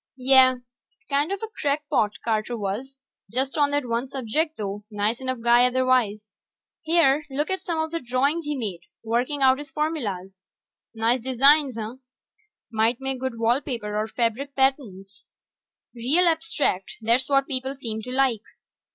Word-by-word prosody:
Yeh, 260 0 +6 0.6
kind 290 +5 +1
of 395 +2 -3
a - - -2
crackpot, 285 -7 0
Carter 225 +1 -1
was. 225 +7 -4 0.3
Just 265 +2 -1
on 290 -2 +3
that 285 -2 -1
one 235 +3 -2
subject, 280 +6 -1
though; 205 0 -4
nice 215 +3 -1
enough 255 -2 -3
guy 240 +1 +5
otherwise. 250 -5 +1 0.5
Here, 315 -3 +3
look 290 +5 -2
at 380 - -2
some 335 -2 -3
of 315 0 -1
the 335 - -2
drawings 275 +6 0
he 295 0 -2
made, 205 -8 -4 0.2
working 245 +5 -1
out 260 +1 +5
his 290 -1 -8
formulas. 210 - -3 0.5
Nice 230 +3 +1
designs, 265 +1 +4
huh? 220 +3 -5 0.7
Might 225 +2 +1
make 265 -1 -3
good 260 -2 -3
wall 235 +4 +2
paper 230 -7 -4
or 215 +1 -1
fabric 240 +5 -2
patterns. 235 -8 -1 0.7
Real 265 +10 +2
abstract... 320 - 0
that's 235 +4 +1
what 275 -1 +3
people 265 0 -3
seem 225 -5 -5
to 250 - -7
like. 255 -4 +1
255 Hz, 155 wpm, -24 LUFS, 225-280 Hz, 0.7 s, Yeh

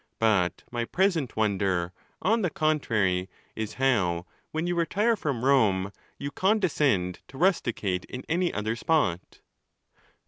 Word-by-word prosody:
But 100 -5 +1
my 120 -1 -2
present 175 - 0
wonder, 95 -4 0 0.3
on 220 +4 +3
the 180 - +1
contrary, 115 - +1 0.3
is, 110 -1 -4
how, 100 -10 +1 0.2
when 160 +2 -2
you 175 - 0
retire 200 +7 +1
from 140 - -2
Rome, 105 -8 +3 0.3
you 140 0 -5
condescend 150 - +1
to 135 - -12
rusticate 120 - +1
in 130 0 -7
any 175 +2 +1
other 110 +2 -2
spot. 120 - 0
125 Hz, 130 wpm, -27 LUFS, -, 0.3 s, on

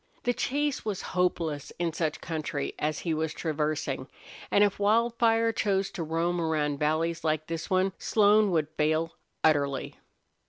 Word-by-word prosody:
The 245 - +2
chase 290 +3 -1
was 210 -3 -3
hopeless 165 -5 0
in 170 -2 -1
such 155 -2 -2
country 155 -3 -3
as 150 0 -1
he 165 - -1
was 160 0 -2
traversing, 150 -4 -2 0.4
and 205 - +5
if 205 -1 +1
Wildfire 230 +2 +3
chose 195 -3 0
to - - -5
roam 165 +2 0
around 150 -3 0
valleys 160 +2 0
like 155 -1 0
this 165 0 -5
one 185 0 +2
Slone 210 0 +4
would 160 -4 +1
fail 155 +2 +1 0.3
utterly. 140 -3 +1
165 Hz, 150 wpm, -28 LUFS, 155-200 Hz, 0.4 s, and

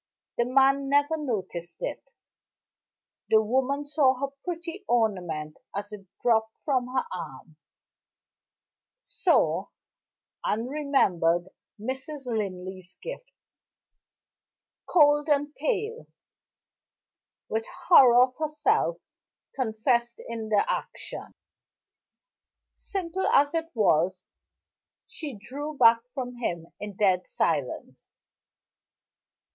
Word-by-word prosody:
The 240 - +4
man 270 +2 +3
never 285 +3 +3
noticed 185 - -4
it. - - -4 1.3
The 220 - +6
woman 265 +6 0
saw 285 -3 +3
her 275 +2 -4
pretty 350 +2 -5
ornament 180 -10 0 0.2
as 205 +1 -4
it 200 -2 -10 0.2
dropped 220 -2 +2
from 255 -4 +1
her 260 - +1
arm 155 -3 -8 1.5
saw, - - +2 0.8
and 225 +3 -1
remembered 190 - +1 0.3
Mrs. 265 +5 -5
Linley's 190 -5 -4
gift. - - -7 1.6
Cold 295 -2 +5
and 290 0 +2
pale 460 +3 -2 1.4
with 225 +1 -2
horror 265 -9 +6
of 255 0 -1
herself 315 +11 +1 0.6
confessed 235 0 0
in 225 -2 -5
the 210 -2 +3
action, - - -5 1.4
simple 380 -1 -3
as 285 +2 +4
it 330 0 -1
was 185 -3 +2 0.8
she 295 -6 -6
drew 285 +8 -7
back 230 -2 +7 0.2
from 250 -2 -4
him 170 -8 -4
in 205 -1 -6
dead 185 -3 +2
silence. - - -2
250 Hz, 95 wpm, -27 LUFS, 205-290 Hz, 1.6 s, back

